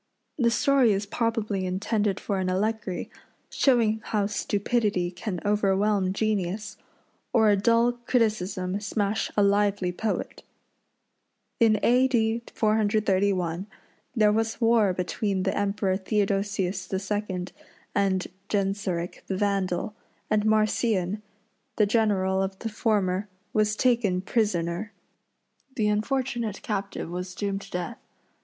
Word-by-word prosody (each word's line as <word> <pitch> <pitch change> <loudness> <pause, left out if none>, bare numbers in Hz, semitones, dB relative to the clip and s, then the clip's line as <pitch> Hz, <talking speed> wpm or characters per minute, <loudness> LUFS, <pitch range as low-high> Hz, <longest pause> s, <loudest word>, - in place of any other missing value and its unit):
The 235 -2 +4
story 255 -1 +4
is 200 +1 -1
probably 215 -3 -1
intended 200 +1 0
for 200 -2 -2
an 185 -1 0
allegory, 210 0 -2 0.4
showing 225 -5 +3
how 210 -2 0
stupidity 205 -2 0
can 180 +1 -4
overwhelm 200 -1 +2
genius, 200 -1 -1 0.6
or 220 -3 +5
a - - +5
dull 230 +4 +3 0.2
criticism 200 -5 0
smash 205 0 -1
a 205 - +5
lively 200 -2 +2
poet. 215 +4 -3 1.2
In 220 -3 +4
A. 250 +2 +5
D. 230 -2 +1
431 200 -4 +1 0.5
there 215 -2 +4
was 225 +1 0
war 225 -4 +4
between 185 +2 -1
the 190 - 0
Emperor 200 -1 0
Theodosius 195 -1 -1
II. 190 -1 -2 0.5
and 195 -2 +1 0.2
Genseric 195 -4 -1
the 190 - -2
Vandal, 195 0 0 0.4
and 215 0 +2
Marcian, 215 -2 +1 0.5
the 210 - +4
general 200 -3 +2
of 190 0 -2
the 225 - -4
former, 205 -3 0 0.2
was 215 0 +2
taken 230 -7 +2
prisoner. 195 -2 -1 0.8
The 210 -2 +1
unfortunate 235 0 -1
captive 200 -4 -3
was 180 +1 -5
doomed 200 -1 -2
to 195 - -12
death. 180 +6 -4
205 Hz, 115 wpm, -26 LUFS, 190-220 Hz, 1.2 s, or